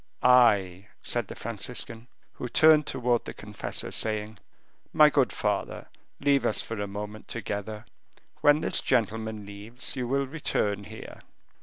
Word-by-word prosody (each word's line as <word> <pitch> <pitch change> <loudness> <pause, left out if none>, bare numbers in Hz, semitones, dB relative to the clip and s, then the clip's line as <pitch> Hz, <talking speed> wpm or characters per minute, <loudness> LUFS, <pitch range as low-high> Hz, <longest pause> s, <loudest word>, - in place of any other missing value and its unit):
"I," 105 -7 +4 0.2
said 120 -4 -1
the - - -8
Franciscan, 115 +1 -5 0.3
who 125 - -6
turned 155 +3 +6
towards 120 -1 0
the - - -7
confessor, - - -5
saying, 110 -1 -3 0.5
"My 150 -1 +6
good 135 -3 +2
father, 105 -2 -2 0.3
leave 140 -2 +3
us 115 - 0
for 115 -2 -3
a 100 - -2
moment 105 +2 -7
together; 105 -1 -5 0.5
when 145 +1 +4
this - - +1
gentleman 110 -3 -1
leaves, 105 +7 -4
you 125 -2 -2
will 140 +2 +1
return 105 -8 -1
here." - - -10
115 Hz, 140 wpm, -27 LUFS, 105-125 Hz, 0.5 s, turned